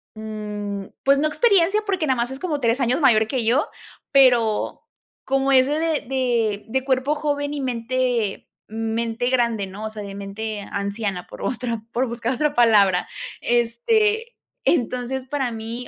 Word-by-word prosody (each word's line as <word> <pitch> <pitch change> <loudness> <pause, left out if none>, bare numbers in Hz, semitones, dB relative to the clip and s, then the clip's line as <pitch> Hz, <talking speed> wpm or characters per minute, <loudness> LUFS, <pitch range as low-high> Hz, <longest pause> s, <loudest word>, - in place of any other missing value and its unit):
mm, 210 -2 -5 0.2
pues, 275 +1 +4
no 310 - +2
experiencia, 400 +2 +3
porque 375 -6 0
nada 260 -2 +2
más 240 +2 -1
es 265 - -7
como 310 -6 -2
3 235 +2 +2
años 250 +5 +2
mayor 220 -6 +5
que 250 -3 -2
yo, 250 +6 +2 0.4
pero 245 -5 +3 0.4
como 270 0 +1
es 260 0 +6
de 295 - 0 0.3
de 235 -5 0
de 265 +3 -1
cuerpo 265 +2 +1
joven 290 -1 -2
y 285 - -3
mente 245 -3 -1 0.2
mente 225 +2 -2
grande 235 -5 +1
¿no? 200 +3 -7
O 220 - -3
sea, 215 -1 -7
de 200 0 -7
mente 205 +1 -5
anciana 200 -2 -3
por - - -11
otra 235 -2 -2
por 255 +2 +1
buscar 235 +1 -2
otra 300 +2 0
palabra. 205 -6 +4 0.3
Este, 420 - +1 0.3
entonces, 255 -2 0
para 265 -2 -2
mí, 230 +2 -6
240 Hz, 160 wpm, -22 LUFS, 220-270 Hz, 0.4 s, es